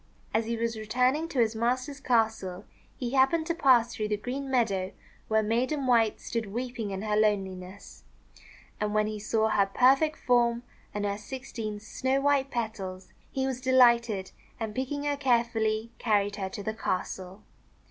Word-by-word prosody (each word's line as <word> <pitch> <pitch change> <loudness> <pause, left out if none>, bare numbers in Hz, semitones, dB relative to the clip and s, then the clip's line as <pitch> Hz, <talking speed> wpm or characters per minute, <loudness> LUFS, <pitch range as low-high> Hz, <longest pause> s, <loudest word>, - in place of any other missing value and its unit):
As 220 0 +1
he 230 0 -1
was 230 -1 -2
returning 255 +8 +1
to 285 - -7
his 225 -2 +2
master's 255 +5 -1
castle, 220 -7 0 0.3
he 245 -2 -3
happened 275 +5 +3
to 335 - 0
pass 250 -8 +4
through 215 -1 -2
the 210 0 0
green 265 +5 -4
meadow 200 -8 +1 0.3
where 220 0 +2
Maiden 255 +6 0
White 230 -4 +3
stood 230 -3 -3
weeping 240 0 -4
in 195 +1 -4
her 210 -1 0
loneliness. 195 -3 -2 0.8
And 210 0 -1
when 215 0 +3
he 215 0 -4
saw 220 +1 +1
her 200 -2 +3
perfect 270 +7 +4
form 240 -1 +2 0.3
and 205 0 -3
her 200 0 -2
sixteen 225 -3 -6
snow 260 +5 -1
white 280 -1 +2
petals, 195 -6 -5 0.2
he 265 -1 -1
was 260 -1 -3
de 260 0 0
lighted, 235 -6 +4 0.3
and, 220 -2 -3
picking 265 +4 -3
her 290 -1 0
carefully, 230 -4 +1
carried 205 -3 +1
her 190 -2 -3
to 200 +1 -7
the 220 - -2
castle. 190 -2 -4
230 Hz, 170 wpm, -28 LUFS, 210-255 Hz, 0.8 s, pass